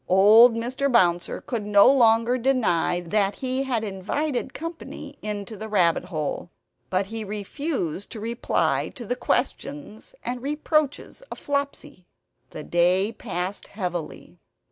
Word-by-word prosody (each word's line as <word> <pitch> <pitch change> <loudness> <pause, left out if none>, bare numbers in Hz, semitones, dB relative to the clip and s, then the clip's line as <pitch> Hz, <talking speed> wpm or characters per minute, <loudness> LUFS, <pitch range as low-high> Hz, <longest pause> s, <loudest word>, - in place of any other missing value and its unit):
Old 215 +5 +7
Mr. 255 +4 -1
Bouncer 175 -7 +2
could 235 -7 -4
no 205 -1 +5
longer 235 -1 +4
deny 220 -9 +1
that 195 +3 0
he 260 0 -1
had 250 -5 -1
invited 245 +8 -2
company 330 +2 -8
into 210 0 -5
the 220 +2 -7
rabbit 180 -4 +2
hole; 160 -1 -4 0.4
but 185 +1 +1
he 220 +2 -5
refused 205 - -3
to 225 - -6
reply 230 +3 0
to 240 - -7
the 245 - -1
questions 280 - -3
and 245 0 -4
reproaches 300 - -1
of - - -7
Flopsy. 280 -10 -4 0.4
The 155 - -8
day 180 +5 +2
passed 190 -3 -5
heavily. 180 -5 -6
220 Hz, 130 wpm, -24 LUFS, 190-260 Hz, 0.4 s, Old